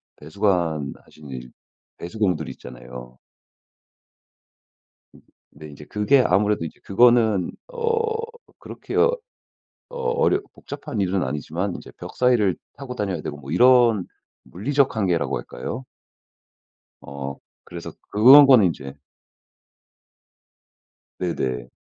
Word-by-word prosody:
배수관하시는 80 -4 -3
이 60 -1 -8 0.5
배수공들 90 -4 -2
있잖아요. 60 0 -11 2.3
네. 75 +2 -12
인제 75 0 -12
그게 105 - +3
아무래도 105 -6 +1
이제 80 - -10
그거는 110 -3 +3 0.2
어 460 -2 -1 0.4
그렇게 - - -8
어 - - +5 0.8
어렵 470 -4 0
복잡한 140 -6 -7
일은 95 -1 0
아니지만 75 +3 -3
이제 - - -12
벽 - - -9
사이를 120 -7 +3 0.2
타고 130 -3 -7
다녀야 100 -7 -3
되고 75 - -5
뭐 70 -1 -10
이런 120 -4 +5 0.4
물리적 135 +6 0
한계라고 90 -6 0
할까요? 115 - -7 1.2
어 70 0 -7 0.3
그래서 85 -1 -8 0.2
그런 130 +8 +9
거는 130 -7 +6
이제 70 -3 -8 2.2
네네. 65 -9 -2
100 Hz, 230 characters per minute, -23 LUFS, 75-125 Hz, 2.3 s, 그런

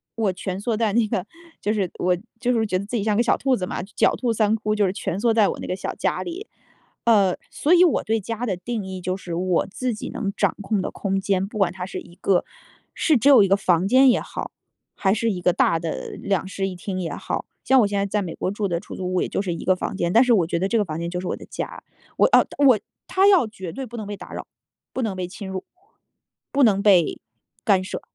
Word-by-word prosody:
我 215 -4 0
蜷 185 +1 -4
缩 220 +2 -1
在 220 -1 +1
那 225 -1 +3
个 185 -2 -2 0.4
就 205 - 0
是 195 -5 0
我 180 0 +2 0.2
就 250 -1 +2
是 225 -2 +2
觉 185 -3 0
得 195 - -4
自 235 +4 -3
己 205 - -1
像 215 -1 +2
个 235 - +3
小 - - +2
兔 265 -1 +2
子 185 - -3
嘛， - - -4
狡 195 - +1
兔 240 -3 +1
3 215 -1 +2
窟， 215 -1 -1
就 210 -1 +2
是 185 - +1
蜷 190 -2 -3
缩 230 +1 +2
在 220 -3 +4
我 - - -3
那 - - -5
个 185 - -1
小 - - -4
家 - - -1
里。 360 +5 -6 0.6
呃， 200 -6 +4
所 310 - +2
以 360 0 +7
我 325 - +2
对 225 +1 0
家 230 +3 -4
的 195 -6 -2
定 215 +2 -4
义， 190 -1 -6
就 185 +1 -2
是 175 -3 -7
我 180 0 +1
自 245 +5 -3
己 215 - -6
能 200 -3 -3
掌 - - +1
控 200 0 0
的 - - -3
空 195 -1 -1
间， 195 -1 0
不 215 - -8
管 195 -4 +2
它 180 -1 -5
是 - - -6
一 175 - -15
个 185 -1 +2 0.5
是 310 -5 +3
只 255 +6 +4
有 265 -6 +8
1 - - +3
个 195 - +4
房 180 -2 +2
间 260 +4 +6
也 245 - +4
好， - - -6 0.4
还 190 -1 +2
是 225 +1 0
一 185 - -3
个 180 0 +3
大 165 - +2
的 165 -1 -4
2 195 -4 0
室 195 0 -2
1 190 - -5
厅 185 +1 -4
也 170 - -3
好。 - - -4 0.2
像 265 0 +5
我 210 - +3
现 200 0 -2
在 200 - +1
在 205 +1 -1
美 175 -4 -5
国 185 - -2
住 205 0 -2
的 170 -2 -1
出 - - -10
租 185 0 -3
屋， 185 - +2
也 - - -2
就 - - -1
是 185 -4 -2
1 165 - -6
个 185 - +5
房 185 - -4
间， 170 -3 0
但 230 - +7
是 250 -2 +4
我 185 -7 +3
觉 170 - -1
得 190 - +1
这 230 - +1
个 215 - +3
房 155 -2 -5
间 170 0 -3
就 180 0 -3
是 185 - -5
我 - - -1
的 - - -11
家。 - - -6 0.4
我 - - +5
哦 - - +7 0.2
我 255 -5 +7 0.3
它 380 +1 +3
要 365 - +5
绝 190 -5 -7
对 265 +6 -5
不 240 -1 -10
能 215 - -5
被 205 0 -5
打 - - -11
扰， - - -6 0.5
不 260 - -2
能 215 -5 -2
被 185 -1 -3
侵 200 +1 -8
入， 190 -1 -4 0.9
不 285 - +1
能 200 -4 +4
被 185 -6 +4 0.4
干 195 -3 +4
涉。 185 - -5
200 Hz, 285 characters per minute, -23 LUFS, 185-225 Hz, 0.9 s, 有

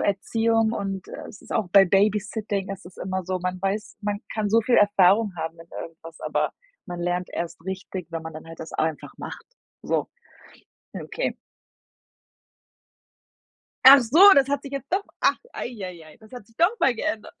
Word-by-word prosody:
Erziehung 225 +3 +1
und 195 -3 -4
äh, - - -8
es 200 - -13
ist - - -9
auch 215 -5 0
bei 195 +1 +8
Babysitting 205 +1 0
ist 185 - -10
es 180 - -14
immer 190 -1 -3
so, 185 0 -2
man 180 0 -3
weiß 195 +2 -3
man 205 -1 -2
kann 215 -2 -1
so 225 +3 +4
viel 240 +2 +3
Erfahrung 205 +1 +4
haben 165 0 -5
in 165 - -13 0.2
irgendwas, 165 0 -12
aber - - -1 0.3
man 175 -2 -6
lernt 175 +1 -1
erst 170 -1 -5
richtig, 190 -2 -5
wenn 165 -1 -4
man 160 - -7
dann 155 +1 -10
halt 165 0 -11
das 160 - -8
einfach 160 -1 -2
macht. - - -8 0.4
So. - - -1 0.9
Ja, - - -5
okay. - - -3 2.5
Ach 275 +1 +11
so, 250 +8 +1 0.2
das 275 -1 +5
hat 285 -1 -1
sich 275 - -9
jetzt 275 0 -6
doch 395 +2 +1 0.2
ach, - - +3 0.2
ei - - -4
ei 175 -3 -8
ei, 155 - -16
das 215 -1 -18
hat 245 -5 -10
sich 225 - -26
noch 365 +8 +3
mal 260 - +4
geändert. 225 -3 -4
200 Hz, 185 wpm, -24 LUFS, 180-225 Hz, 2.5 s, Ach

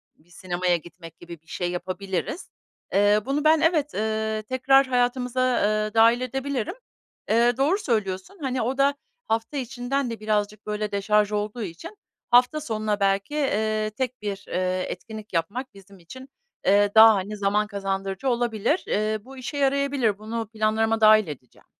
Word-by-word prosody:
bir 160 +3 -29
sinemaya 180 0 -1
gitmek 165 0 -13
gibi 170 -2 -11
bir 160 - -37
şey 175 0 -3
yapabiliriz. 185 - -4 0.4
Eee, 205 +2 +4
bunu 280 +2 -1
ben, 310 0 +4
evet, 320 -3 +2
ııı, 220 0 -2
tekrar 260 +3 +3
hayatımıza, 250 0 0 0.2
ııı, 215 0 0
dâhil 230 +2 +5
edebilirim. 270 - -3 0.5
Eee, 235 +2 +3
doğru 295 +8 +2
söylüyorsun. 220 - -2
Hani, 260 -2 -1
o 255 +4 -2
da 275 +1 +3 0.3
hafta 225 +6 -2
içinden 255 +1 -2
de 230 - -6
birazcık, 210 0 -2
böyle, 210 0 -3
deşarj 210 +1 +1
olduğu 210 +2 -3
için 180 - -8 0.3
hafta 250 +5 +4
sonuna 215 -5 -2
belki, 195 +7 0
eee, 215 -6 0
tek 255 -2 -3
bir, 200 -1 -5
eee, 185 0 -1
etkinlik 215 +2 -8
yapmak 210 +10 -2
bizim 195 0 -16
için, 260 +11 -12 0.4
eee, 205 +1 +4
daha, 220 0 +9
hani, 200 +2 -4
zaman 205 +1 +1
kazandırıcı 195 +3 -3
olabilir. 240 - 0
Eee, 215 +1 0
bu 270 +1 -12
işe 265 +3 -6
yarayabilir. 275 -5 +1
Bunu 225 +1 -4
planlarıma 220 0 0
dâhil 215 -2 +6
edeceğim. 130 -5 -11
215 Hz, 155 wpm, -24 LUFS, 200-255 Hz, 0.5 s, daha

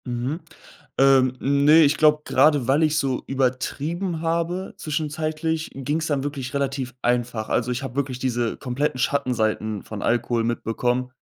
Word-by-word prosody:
Mhm. 125 +5 -3 0.6
Ähm, 130 -1 +4
ne, 140 +3 +5
ich 145 0 +3
glaube, 150 0 +4
grade 145 -2 +3
weil 140 +4 +3
ich 155 -1 +2
so 135 -4 -1
übertrieben 145 +7 -2
habe 170 +3 -2
zwischenzeitlich, 155 +1 -2
ging's 150 +4 -2
dann 140 -3 0
wirklich 140 -3 -5
relativ 135 -2 -2
einfach. 120 -2 0
Also, 120 0 0
ich 125 +3 -3
habe 130 -2 -6
wirklich 135 -3 -2
diese 120 -3 -1
kompletten 130 0 -2
Schattenseiten 110 -6 0
von 110 -2 -7
Alkohol 120 0 +1
mitbekommen 120 +2 -1
135 Hz, 145 wpm, -23 LUFS, 125-150 Hz, 0.6 s, ne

